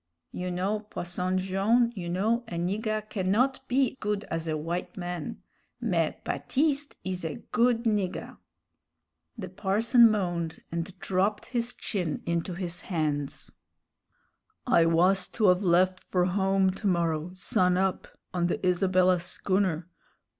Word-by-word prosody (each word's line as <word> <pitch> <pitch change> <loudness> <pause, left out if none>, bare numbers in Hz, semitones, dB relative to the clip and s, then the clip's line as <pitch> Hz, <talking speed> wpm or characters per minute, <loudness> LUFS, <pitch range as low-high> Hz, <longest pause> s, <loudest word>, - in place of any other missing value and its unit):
"You 180 0 -4
know, 190 +4 -1
Posson 185 -3 -3
Jone', 200 +6 +2
you 175 -3 -5
know, 220 +7 +1
a 175 - -6
nigger 215 +5 -1
cannot 215 +8 +1
be 260 +1 +1
good 210 0 -1
as 165 0 -2
a 160 - 0
w'ite 170 +6 -4
man 175 -3 -5 0.4
mais - - 0
Baptiste 290 +1 0
is 185 -1 -3
a 160 -3 -3 0.2
good 235 -1 +3
nigger." 205 -5 -1 1.0
The 195 -5 -5
parson 220 +5 +4
moaned 175 -6 -2
and 170 +3 -4
dropped 195 +3 0
his 240 -1 -3
chin 175 -8 -3
into 170 +2 -1
his 175 -1 -4
hands. 150 -5 -2 1.1
"I 170 - +4
was 180 +3 +3
to 210 -4 +5
of 180 +1 +4
left 185 +1 +3
for 180 -1 +1
home 190 0 +2
to 200 +3 -4
morrow, 170 -2 0
sun 180 -1 +2
up, 190 0 0 0.3
on 175 -1 +1
the 185 - -1
Isabella 185 0 +3
schooner. 180 -1 0
185 Hz, 135 wpm, -28 LUFS, 175-210 Hz, 1.1 s, to